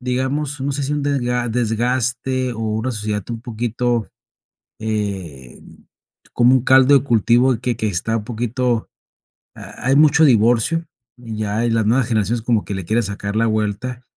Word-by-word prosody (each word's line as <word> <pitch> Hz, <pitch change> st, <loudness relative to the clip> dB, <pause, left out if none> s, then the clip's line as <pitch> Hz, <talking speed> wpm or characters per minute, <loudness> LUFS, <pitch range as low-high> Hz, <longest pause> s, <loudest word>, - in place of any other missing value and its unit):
digamos, 130 Hz, +3 st, -2 dB
no 140 Hz, +2 st, -1 dB
sé, 140 Hz, +1 st, -3 dB
si 145 Hz, -, -2 dB
un 145 Hz, -, -2 dB
dega 125 Hz, -4 st, -1 dB
desgaste 125 Hz, +2 st, -1 dB
o 115 Hz, -, -7 dB
una 110 Hz, +3 st, -2 dB
sociedad 105 Hz, -2 st, -3 dB
un 115 Hz, -1 st, -5 dB
poquito, 120 Hz, 0 st, -2 dB, 0.7 s
eh, 95 Hz, -, -4 dB, 0.7 s
como 125 Hz, +1 st, +4 dB
un 130 Hz, -, +2 dB
caldo 130 Hz, +1 st, +6 dB
de 135 Hz, -, -2 dB
cultivo 120 Hz, +1 st, +3 dB
que 125 Hz, -1 st, -2 dB
que 110 Hz, -, -1 dB
está 105 Hz, +4 st, -1 dB
un 105 Hz, -, -5 dB
poquito. 120 Hz, 0 st, -2 dB, 0.7 s
Ha 125 Hz, -, -7 dB
hay 135 Hz, -, +4 dB
mucho 155 Hz, +1 st, +5 dB
divorcio, 120 Hz, +6 st, +3 dB, 0.3 s
ya 110 Hz, -2 st, -3 dB
las 115 Hz, -2 st, +1 dB
nuevas 120 Hz, +3 st, +2 dB
generaciones 115 Hz, 0 st, 0 dB
como 115 Hz, -3 st, +1 dB
que -, -, -5 dB
le 95 Hz, -2 st, -5 dB
quieren 115 Hz, +6 st, +1 dB
sacar 100 Hz, 0 st, -5 dB
la 115 Hz, +1 st, +2 dB
vuelta, 110 Hz, +3 st, -2 dB
120 Hz, 160 wpm, -19 LUFS, 110-130 Hz, 0.7 s, caldo